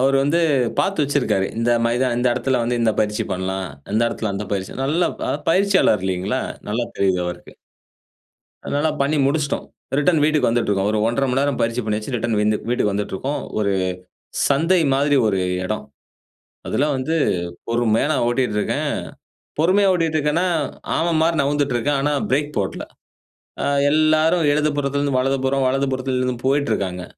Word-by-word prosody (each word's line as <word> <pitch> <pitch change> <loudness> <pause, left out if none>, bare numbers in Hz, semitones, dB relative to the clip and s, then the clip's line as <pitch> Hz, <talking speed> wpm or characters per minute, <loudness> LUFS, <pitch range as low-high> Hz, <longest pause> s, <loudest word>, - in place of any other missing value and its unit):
அவரு 135 +1 +3
வந்து, 160 +5 +2 0.4
பாத்து 195 -5 +1
வச்சிருக்கிறாரு. 135 -9 0
இந்த 115 +1 +1 0.2
மைதா 125 +2 +1
இந்த 120 - 0
இடத்துல 130 +1 0
வந்து 120 +1 -1
இந்த 115 - +3
பயிற்சி 105 0 0
பண்ணலாம், 95 +1 -3 0.3
இந்த 110 +2 +2
இடத்துல 110 -2 -3
அந்த 100 +2 -3
பயிற்சி, 95 -1 -2
நல்ல 160 +6 +1 0.2
அ - - +1 0.2
பயிற்சியாளர் 190 - +3
இல்லிங்களா? 95 +6 -1 0.3
நல்லா 115 +3 -1
தெரியுது 95 -2 +2
அவருக்கு. 90 - -7 1.1
அதனால 145 +2 0
பண்ணி 145 +3 +1
முடிச்சுட்டோம். 145 0 -1 0.3
ரிட்டர்ன் 150 +2 +3
வீட்டுக்கு 150 -5 +2
வந்துட்டிருக்கோம். 105 -4 +1
ஒரு 110 - 0
1:30 120 +4 0
மணி 135 - +1
நேரம் 140 -2 0
பயிற்ச்சி 115 +2 0
பண்ணியாச்சு, 105 +3 -3
ரிட்டர்ன் 115 -2 -1
விந்து 105 0 +2
வீட்டுக்கு 120 -4 +1
வந்துட்டுருக்கோம். 105 +8 -3 0.2
ஒரு 100 -2 +1 0.8
சந்தை 165 +6 +3
மாரி, 140 +1 +2
ஒரு 95 -3 +1 0.3
இடம். - - -3 0.8
அதெல்லாம் 145 +1 +1
வந்து, 130 +5 -2 0.6
பொறுமையா 115 +3 +1 0.2
ஓட்டிட்டு 120 -3 0
இருக்கேன். - - -1 0.7
பொறுமையா 190 +5 +4
ஓட்டிட்டு 165 -3 0
இருக்கேனா, 150 +5 +1 0.5
ஆமை 170 +1 +1
மாரி, 165 +1 +2
நகர்ந்துட்டு 145 -2 0
இருக்கேன். 140 +4 0
ஆனா, 145 +1 +1 0.2
பிரேக் 145 +2 0
போட்ல. 95 - -3 0.8
அ - - 0 0.3
எல்லாரும் 155 +2 +3
எழுது 150 +1 +2
புறத்திலிருந்து 140 -1 0
வலதுபுறம், 135 0 0
வலது 135 +2 +1
புறத்திலிருந்து 130 -1 -1
போயிட்டு 140 -1 +1
இருக்காங்க. 90 -3 -3
135 Hz, 150 wpm, -21 LUFS, 110-150 Hz, 1.1 s, பொறுமையா